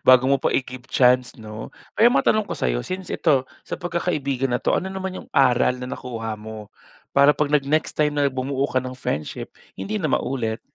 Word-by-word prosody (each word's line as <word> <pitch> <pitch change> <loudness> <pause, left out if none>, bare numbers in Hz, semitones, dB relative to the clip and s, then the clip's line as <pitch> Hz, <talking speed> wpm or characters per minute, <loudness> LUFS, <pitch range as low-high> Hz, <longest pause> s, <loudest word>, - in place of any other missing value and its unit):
Bago 130 0 +7
mo 140 - +4
pa - - +2
i-give 130 -1 -3
chance 125 -1 +3
'no. 110 0 -8 0.3
Pero 235 +2 +6
matanong 215 -5 +3
ko - - -3
sa'yo, - - 0
since 185 0 -5
ito 135 -5 +2 0.2
sa - - -5
pagkakaibigan 150 -7 -1
na 125 - +2
'to, - - +1
ano 190 - -2
naman 190 -1 -4
yung - - -23
aral 125 -2 +3
na 125 - -5
nakuha 115 -3 -5
mo 110 -1 -9 0.4
para 140 +1 +6
'pag 150 -1 0
nag-next 150 +2 +2
time 150 -1 +2
na 145 - +3
bumuo 135 +1 -1
ka 130 - +1
ng 130 0 -7
friendship, 75 - -4 0.2
hindi 215 +1 -3
na 155 - 0
maulit? 115 -3 -1
130 Hz, 195 wpm, -23 LUFS, 125-150 Hz, 0.4 s, Bago